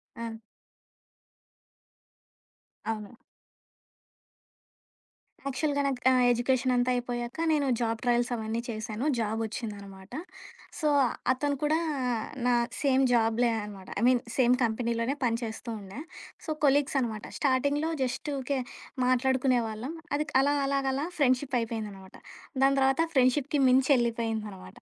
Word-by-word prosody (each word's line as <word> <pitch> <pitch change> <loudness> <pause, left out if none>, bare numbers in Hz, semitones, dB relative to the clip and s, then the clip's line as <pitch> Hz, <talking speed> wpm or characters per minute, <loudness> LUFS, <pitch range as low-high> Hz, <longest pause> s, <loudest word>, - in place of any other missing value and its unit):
ఆ! 230 -1 -6 2.5
అవును. 215 +1 -5 2.3
యాక్చువల్‌గా 285 +1 0
నాకు 265 -2 -1
ఆహ్, 255 -1 +4
ఎడ్యుకేషనంతా 250 +1 +2
అయిపోయాక 240 0 -3
నేను 295 -3 +2
జాబ్ 225 -1 0
ట్రయల్స్ 240 0 +2
అవన్నీ 225 0 -2
చేశాను. 220 +2 -4
జాబొచ్చిందన్నమాట. 210 -3 -4 0.7
సో, 305 - +2 0.4
అతను 285 +2 0
కూడా 310 +2 +3 0.7
నా 250 - +4 0.3
సేమ్ 270 -2 +3
జాబులే 230 +1 +3
అన్నమాట. 200 -2 -9
ఐ - - -2
మీన్ 250 -1 +4 0.2
సేమ్ 250 -2 +5
కంపెనీలోనే 235 +2 0
పని 230 -1 +1
చేస్తూ 225 +1 -6
ఉండే. 195 +4 -9 0.5
సో, - - -7 0.2
కొలీగ్స్ 285 +1 +3
అన్నమాట. 220 -4 -3
స్టార్టింగ్‌లో 285 +3 +1
జస్టు 260 +4 -3
ఊకే 270 +1 -1 0.5
మాట్లాడుకునే 255 0 +3
వాళ్ళం. 220 +7 -5 0.2
అది 300 +1 0 0.2
అలాగలా 280 0 +1
అలా 285 +4 -1
ఫ్రెండ్షిపయిపోయిందనమాట. 230 -8 -1 0.5
దాని 275 0 +4
తర్వాత 270 +3 +3
ఫ్రెండ్‌షిప్‌కి 265 +3 +3
మించెళ్ళిపోయిందనమాట. 230 -7 +1
245 Hz, 105 wpm, -28 LUFS, 225-270 Hz, 2.5 s, సేమ్